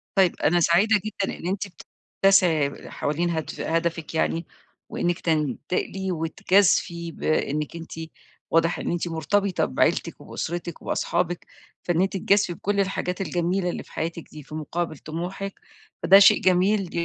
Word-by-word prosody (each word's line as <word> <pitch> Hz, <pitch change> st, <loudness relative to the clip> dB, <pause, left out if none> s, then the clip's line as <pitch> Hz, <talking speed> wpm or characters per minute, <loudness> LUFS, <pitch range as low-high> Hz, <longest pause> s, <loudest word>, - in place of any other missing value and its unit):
طيب، 190 Hz, -3 st, +4 dB
أنا 175 Hz, +4 st, +4 dB
سعيدة 195 Hz, +7 st, +4 dB
جدًا 205 Hz, -2 st, -3 dB
إن 170 Hz, -, -6 dB
أنتِ 195 Hz, +2 st, -2 dB
بت 180 Hz, -, -15 dB, 0.4 s
تسعي 170 Hz, -7 st, +3 dB
حوالين 170 Hz, +4 st, -1 dB
هدف 160 Hz, -3 st, -4 dB
هدفِك 165 Hz, -1 st, -1 dB
يعني 165 Hz, +1 st, 0 dB, 0.4 s
وإنِّك 175 Hz, -1 st, -1 dB
تنتقلي 165 Hz, +5 st, -1 dB
وتجازفي 170 Hz, +1 st, +2 dB
بإنِّك 150 Hz, -1 st, -1 dB
أنتِ 165 Hz, 0 st, -8 dB, 0.6 s
واضح 165 Hz, +1 st, +2 dB
إن -, -, -2 dB
أنتِ 175 Hz, 0 st, -1 dB
مرتبطة 190 Hz, +4 st, 0 dB
بعيلتِك، 65 Hz, -, 0 dB
وبأُسرتِك 170 Hz, 0 st, -5 dB
وبأصحابِك، 175 Hz, 0 st, -1 dB, 0.4 s
فإن 175 Hz, -1 st, +1 dB
أنتِ 190 Hz, -, +1 dB
تجازفي 195 Hz, -1 st, +2 dB
بكُلّ 200 Hz, +4 st, -2 dB
الحاجات 190 Hz, -1 st, -1 dB
الجميلة 180 Hz, 0 st, 0 dB
اللي -, -, -4 dB
في -, -, -20 dB
حياتِك 165 Hz, +1 st, -4 dB
دي، 150 Hz, -2 st, -10 dB
في 155 Hz, -, -10 dB
مُقابل 160 Hz, +1 st, -3 dB
طموحِك 180 Hz, +6 st, -5 dB, 0.5 s
فده 195 Hz, +1 st, +8 dB
شيء 200 Hz, -, +7 dB
جميل 185 Hz, +1 st, +3 dB
175 Hz, 140 wpm, -25 LUFS, 165-190 Hz, 0.6 s, فده